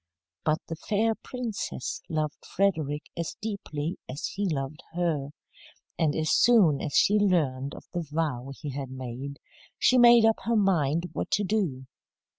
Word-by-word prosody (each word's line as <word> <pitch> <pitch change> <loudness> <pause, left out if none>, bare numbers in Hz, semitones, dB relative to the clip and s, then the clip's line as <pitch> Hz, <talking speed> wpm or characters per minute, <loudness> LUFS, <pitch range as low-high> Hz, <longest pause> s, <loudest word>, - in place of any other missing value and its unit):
But 155 0 +2
the 165 - -4
fair 220 +6 +1
princess 230 - -5
loved 155 -2 -2
Frederick 155 -7 0
as 170 -1 -4
deeply 185 -6 -4
as 140 +4 -4
he 200 0 -1
loved 140 -1 -3
her, 165 -5 -1 0.7
and 155 -3 +2
as 155 0 0
soon 195 -12 +5
as 145 - -4
she 210 +1 +5
learned 145 -9 +1
of - - -11
the 175 - -1
vow 150 -5 -2
he 150 -3 -5
had 135 -1 -5
made, 130 +2 -6 0.4
she 255 - +4
made 235 -1 +8
up 225 0 +3
her 230 +1 +2
mind 170 -4 +2
what - - -3
to 205 - +2
do. 180 -11 -1
160 Hz, 155 wpm, -27 LUFS, 140-200 Hz, 0.7 s, made